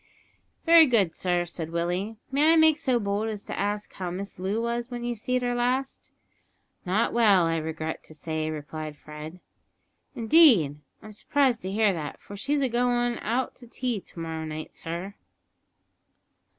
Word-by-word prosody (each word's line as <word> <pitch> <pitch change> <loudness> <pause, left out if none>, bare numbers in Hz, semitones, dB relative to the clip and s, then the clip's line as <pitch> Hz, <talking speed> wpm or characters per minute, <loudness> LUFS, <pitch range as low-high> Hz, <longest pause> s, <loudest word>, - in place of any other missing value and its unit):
"Wery 330 -2 +8
good, 205 -9 +2
sir," 175 -1 0
said 165 -1 -6
Willie. 175 +6 -2
"May 300 +4 +4
I - - +5
make 315 -1 +5
so 255 -3 +1
bold 205 +1 -1
as 210 -2 -5
to - - -5
ask 205 +1 -2
how 185 -2 -4
Miss 190 +3 -6
Loo 195 +4 -1
was 235 +1 -2
when 240 -1 -5
you 240 0 -1
seed 250 +3 -2
her 245 0 0
last?" 250 +2 -1 0.8
"Not 200 +5 +1
well, 210 -6 +5
I 165 0 0
regret 160 0 -4
to 155 - -14
say," 155 0 -3
replied 155 0 -6
Fred. 155 +4 -9 0.8
"Indeed! 225 - +5 0.2
I'm 215 - -10
surprised 260 +2 +1
to 190 - -4
hear 210 -1 +3
that, 150 -4 -5
for 205 - -11
she's 280 +8 0
agoin' 245 -1 +1
out 245 +4 -1
to 240 - -14
tea 245 -2 -2
to 170 - -13
morrow 160 -1 -4
night, 155 0 -6
sir." 170 +4 -6
205 Hz, 165 wpm, -26 LUFS, 165-245 Hz, 0.8 s, Wery